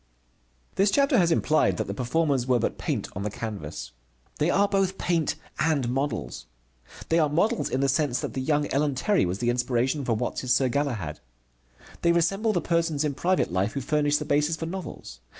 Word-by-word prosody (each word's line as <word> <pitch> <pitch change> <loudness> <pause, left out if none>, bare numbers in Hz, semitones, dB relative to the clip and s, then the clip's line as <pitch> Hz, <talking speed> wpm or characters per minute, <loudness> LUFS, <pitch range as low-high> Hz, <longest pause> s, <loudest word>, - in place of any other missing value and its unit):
This 195 +1 +4
chapter 275 +1 +3
has 170 -2 +3
implied 150 - +2
that - - -1
the 100 - -4
performers 130 +2 0
were 125 -1 +4
but - - -2
paint - - -2
on 95 - -4
the 105 - -2
canvas. 100 - -6 0.5
They 150 - +2
are 200 +3 +3
both 195 -1 0
paint 170 -3 0 0.2
and 145 -7 +1
models. 110 - -3 0.6
They 165 - +3
are 155 -2 +3
models 210 +10 +1
in 130 - -1
the 140 - +2
sense 135 -2 +1
that - - -4
the 130 - -2
young 145 +2 +1
Ellen 145 0 +1
Terry 190 - +2
was 90 +2 -2
the 120 +2 +1
inspiration 125 +3 0
for 120 - 0
Watts' 125 +2 -2
Sir 130 0 +3
Galahad. 120 - -2 0.8
They 170 - +4
resemble 195 +6 +1
the 175 - 0
persons 165 -3 0
in 150 -2 0
private 180 - 0
life 95 +3 0
who 140 - -3
furnish 145 +1 +1
the 150 - -4
basis 150 +2 +1
for 165 - -5
novels. 165 - -7
145 Hz, 195 wpm, -26 LUFS, 120-165 Hz, 0.8 s, This